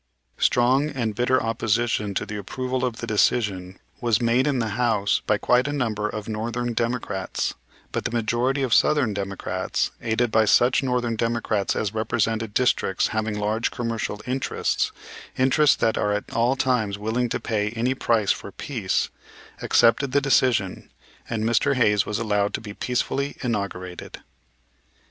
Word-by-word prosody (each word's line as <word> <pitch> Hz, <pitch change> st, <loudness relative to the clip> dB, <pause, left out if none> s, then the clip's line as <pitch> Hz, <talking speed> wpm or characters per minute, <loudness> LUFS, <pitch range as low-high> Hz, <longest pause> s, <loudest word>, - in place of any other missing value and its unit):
Strong 130 Hz, +5 st, +3 dB
and 120 Hz, -7 st, -2 dB
bitter 125 Hz, +4 st, +2 dB
opposition 115 Hz, -2 st, 0 dB
to -, -, -1 dB
the 105 Hz, -, -6 dB
approval 130 Hz, +6 st, -3 dB
of 125 Hz, -3 st, -1 dB
the 120 Hz, -, -5 dB
decision 100 Hz, -4 st, 0 dB, 0.2 s
was 115 Hz, -4 st, +2 dB
made 120 Hz, +3 st, +2 dB
in 140 Hz, -3 st, +1 dB
the 115 Hz, -2 st, -1 dB
House 105 Hz, -2 st, +1 dB
by -, -, +3 dB
quite 125 Hz, +2 st, +2 dB
a -, -, -1 dB
number 110 Hz, -7 st, -1 dB
of 105 Hz, -1 st, -6 dB
northern 115 Hz, +2 st, -2 dB
Democrats, 115 Hz, -5 st, -2 dB, 0.4 s
but -, -, -3 dB
the -, -, +1 dB
majority 120 Hz, +4 st, 0 dB
of 125 Hz, -4 st, +1 dB
southern 145 Hz, -8 st, +3 dB
Democrats, 95 Hz, -1 st, -2 dB
aided 115 Hz, 0 st, 0 dB
by 110 Hz, 0 st, +4 dB
such 120 Hz, +4 st, +4 dB
northern 125 Hz, -3 st, 0 dB
Democrats 115 Hz, -3 st, 0 dB
as 105 Hz, -1 st, -1 dB
represented 110 Hz, 0 st, -1 dB
districts 120 Hz, -6 st, +2 dB
having 110 Hz, -1 st, -2 dB
large 105 Hz, +2 st, 0 dB
commercial 115 Hz, -3 st, -3 dB
interests, 130 Hz, +1 st, -1 dB, 0.5 s
interests 135 Hz, +3 st, +4 dB
that 110 Hz, -, +1 dB
are 105 Hz, -, +1 dB
at 105 Hz, -, -4 dB
all 120 Hz, +3 st, +2 dB
times 115 Hz, -7 st, 0 dB
willing 115 Hz, +4 st, -1 dB
to -, -, -2 dB
pay 105 Hz, -2 st, -1 dB
any 120 Hz, +4 st, -1 dB
price 115 Hz, -5 st, +1 dB
for -, -, -4 dB
peace, -, -, -2 dB, 0.5 s
accepted 125 Hz, +4 st, +3 dB
the 140 Hz, -, +5 dB
decision, 125 Hz, -8 st, +1 dB, 0.4 s
and 110 Hz, -2 st, -2 dB
Mr. 120 Hz, +5 st, +2 dB
Hayes 105 Hz, -5 st, +3 dB
was 105 Hz, -, -1 dB
allowed 105 Hz, -2 st, 0 dB
to -, -, -3 dB
be 105 Hz, -2 st, -8 dB
peacefully 135 Hz, +5 st, -2 dB
inaugurated. 100 Hz, -6 st, -4 dB
115 Hz, 155 wpm, -24 LUFS, 105-125 Hz, 0.5 s, the